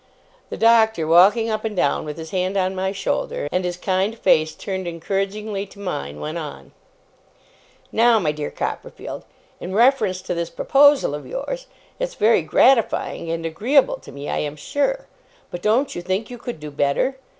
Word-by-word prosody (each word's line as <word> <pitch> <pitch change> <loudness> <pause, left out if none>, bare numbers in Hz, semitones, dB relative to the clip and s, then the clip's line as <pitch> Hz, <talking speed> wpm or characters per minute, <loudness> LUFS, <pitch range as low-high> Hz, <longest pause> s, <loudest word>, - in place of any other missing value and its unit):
The - - -5
Doctor, 220 -6 +4
walking 200 +8 +5
up 215 - -2
and 220 -2 -3
down 145 -5 +1
with 150 0 -6
his 160 -1 -8
hand 185 +1 -1
on 185 0 +1
my 190 0 -1
shoulder, 190 -6 -2
and 180 - 0
his 180 0 -3
kind 190 +4 -1
face 155 -6 +2
turned 190 -2 -4
encouragingly 195 +4 -3
to 200 - -16
mine, 75 - -5
went 155 +3 -4
on: 145 - -8 1.2
'Now, 235 0 +4
my 165 -8 +1
dear 150 -1 -4
Copperfield, - - -6 0.3
in 185 +2 -5
reference 220 -6 +3
to - - -3
this 170 -1 -3
proposal 285 - +4
of 145 - -6
yours. - - -5 0.3
It's - - -3
very - - +4
gratifying 230 -9 +2
and 165 0 -3
agreeable 265 - +2
to - - -13
me, 140 +1 -8
I - - -1
am 150 0 -3
sure; 290 - -1 0.5
but 175 - -6
don't 235 +8 +2
you 175 - -5
think 190 +6 -2
you 245 - -8
could 240 -8 -6
do 150 0 -8
better? 145 - 0
190 Hz, 175 wpm, -22 LUFS, 165-230 Hz, 1.2 s, walking